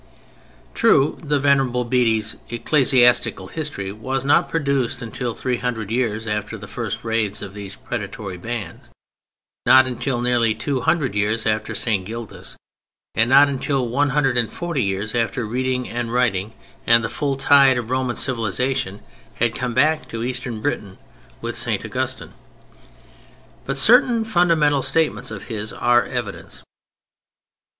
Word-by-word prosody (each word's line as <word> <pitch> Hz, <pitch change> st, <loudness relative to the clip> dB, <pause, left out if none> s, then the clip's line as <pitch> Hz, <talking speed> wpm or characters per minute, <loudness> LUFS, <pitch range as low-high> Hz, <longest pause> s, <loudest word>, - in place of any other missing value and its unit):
True, 150 Hz, -11 st, +3 dB
the 150 Hz, -2 st, 0 dB
Venerable 135 Hz, -3 st, +2 dB
Bede's 115 Hz, -3 st, +1 dB
Ecclesiastical 120 Hz, -5 st, +3 dB
History 145 Hz, -12 st, -4 dB
was 130 Hz, +5 st, -4 dB
not 155 Hz, +5 st, +3 dB
produced 140 Hz, -6 st, 0 dB
until 115 Hz, 0 st, -4 dB
three 125 Hz, -2 st, -2 dB
hundred 115 Hz, -4 st, -3 dB
years 115 Hz, -2 st, -1 dB
after 105 Hz, +1 st, -3 dB
the 105 Hz, -, -9 dB
first 115 Hz, 0 st, -5 dB
raids 110 Hz, -3 st, -1 dB
of 100 Hz, -1 st, -8 dB
these 100 Hz, -1 st, -8 dB
predatory 105 Hz, -4 st, -6 dB
bands, 110 Hz, +3 st, -6 dB, 0.8 s
not 130 Hz, 0 st, +7 dB
until 130 Hz, 0 st, -2 dB
nearly 120 Hz, -2 st, +1 dB
two 130 Hz, +3 st, -2 dB
hundred 145 Hz, -, +1 dB
years 105 Hz, +2 st, 0 dB
after 110 Hz, 0 st, -1 dB
St. 105 Hz, -5 st, 0 dB
Gildas, 115 Hz, +2 st, -8 dB, 0.6 s
and 115 Hz, +1 st, +2 dB
not 140 Hz, +2 st, +7 dB
until 135 Hz, -2 st, -1 dB
one 145 Hz, +5 st, +1 dB
hundred 135 Hz, -3 st, +2 dB
and 115 Hz, -, 0 dB
forty 170 Hz, -6 st, -3 dB
years 100 Hz, +1 st, -2 dB
after 120 Hz, +1 st, -1 dB
reading 125 Hz, +2 st, -2 dB
and 120 Hz, -1 st, -4 dB
writing 110 Hz, -4 st, 0 dB, 0.3 s
and 115 Hz, 0 st, +5 dB
the -, -, 0 dB
full 140 Hz, +1 st, -2 dB
tide 135 Hz, -1 st, +5 dB
of 120 Hz, 0 st, -4 dB
Roman 130 Hz, -2 st, 0 dB
civilization 115 Hz, -3 st, -1 dB, 0.3 s
had 120 Hz, 0 st, 0 dB
come 125 Hz, -1 st, -3 dB
back 155 Hz, +4 st, +2 dB
to 115 Hz, 0 st, -5 dB
Eastern 125 Hz, -2 st, -4 dB
Britain 105 Hz, -7 st, -3 dB, 0.4 s
with -, -, -4 dB
St. -, -, -1 dB
Augustine: -, -, -3 dB, 1.3 s
but 135 Hz, 0 st, -2 dB
certain 230 Hz, -, +5 dB
fundamental 165 Hz, -8 st, +3 dB
statements 135 Hz, -4 st, 0 dB
of -, -, -7 dB
his 110 Hz, -2 st, -4 dB
are 120 Hz, 0 st, +2 dB
evidence. 120 Hz, -6 st, -6 dB
120 Hz, 140 wpm, -21 LUFS, 110-135 Hz, 1.3 s, not